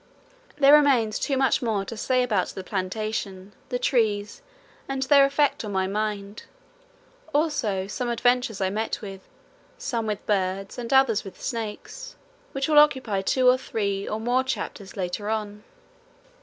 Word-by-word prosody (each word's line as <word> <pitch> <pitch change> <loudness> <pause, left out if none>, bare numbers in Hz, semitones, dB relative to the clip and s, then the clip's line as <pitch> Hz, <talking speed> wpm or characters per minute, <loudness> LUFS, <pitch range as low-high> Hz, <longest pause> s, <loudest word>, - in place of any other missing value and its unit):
There 280 0 +6
remains, 265 -8 +4
too, 275 -2 0
much 265 -1 +2
more 215 -5 -1
to 230 - -7
say 255 +3 +1
about 210 -7 0
the 190 - -7
plantation, 195 0 -4 0.2
the 250 - -1
trees 215 -5 0 0.5
and 270 -1 -1
their 275 +1 +6
effect 280 -1 +1
on 210 - -5
my 190 0 +1
mind, 205 0 -3 0.9
also 260 - 0
some 240 +5 -3
adventures 245 -2 +1
I 190 0 +1
met 220 +2 -2
with, 195 -2 -8 0.6
some 230 -2 -3
with 210 -1 -3
birds 195 +1 -1
and 235 +1 -5
others 265 -6 +4
with 195 - -11
snakes, 230 - -6 0.4
which 270 0 -2
will 300 -1 +6
occupy 260 -9 +3
two 255 +6 +2
or 250 +1 +5
three 200 -5 -2
or 215 - -3
more 245 +3 +1
chapters 205 -6 -5
later 190 +3 -3
on. 210 -1 -3
220 Hz, 155 wpm, -25 LUFS, 200-260 Hz, 0.9 s, There